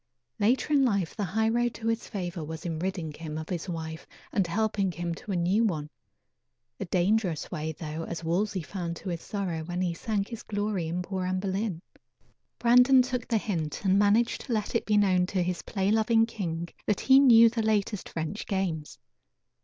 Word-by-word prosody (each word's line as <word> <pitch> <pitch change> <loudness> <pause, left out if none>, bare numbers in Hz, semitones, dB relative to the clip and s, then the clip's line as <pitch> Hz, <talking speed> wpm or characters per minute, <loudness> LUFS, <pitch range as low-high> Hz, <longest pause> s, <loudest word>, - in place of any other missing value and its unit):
Later 250 +8 +2
in 280 -2 +5
life 200 -9 0
the 210 - -2
high 220 +5 0
road 240 +1 +1
to 225 - -8
his 225 0 -1
favor 175 -5 -4
was 160 +2 -7
in 165 -2 -3
ridding 175 -3 -3
him 155 0 -6
of 160 0 -6
his 180 +1 -3
wife 160 -1 -5 0.2
and 195 -4 +1
helping 200 0 0
him 170 0 -3
to 200 - -7
a - - 0
new 180 +6 +2
one 155 -8 -1 0.9
a - - -3
dangerous 185 -1 0
way 160 -2 -3
though, 155 +1 -5
as 170 0 -6
Wolsey 185 +2 0
found 170 -1 -4
to 185 - -7
his 170 -2 -3
sorrow 185 -6 -3
when 175 +2 -4
he 180 -2 0
sank 200 +3 -2
his 230 -2 -6
glory 205 -4 -2
in 175 +2 -2
poor 185 0 -3
Anne 185 0 0
Boleyn. 190 -2 -2 0.7
Brandon 250 +2 +6
took 250 -1 -3
the 230 - +2
hint 175 -5 -3
and 190 +1 +4
managed 210 +3 +3
to 240 - -4
let 215 -2 -1
it - - 0
be 210 -1 +3
known 185 -3 +3
to 185 -1 0
his 180 0 -2
play 195 -1 -1
loving 225 +1 +4
king 175 -7 -4 0.2
that 210 - +1
he 265 0 +7
knew 230 -4 +8
the 230 0 0
latest 210 -2 0
French 165 +6 -4
games. 180 -7 -2
190 Hz, 200 wpm, -28 LUFS, 170-220 Hz, 0.9 s, knew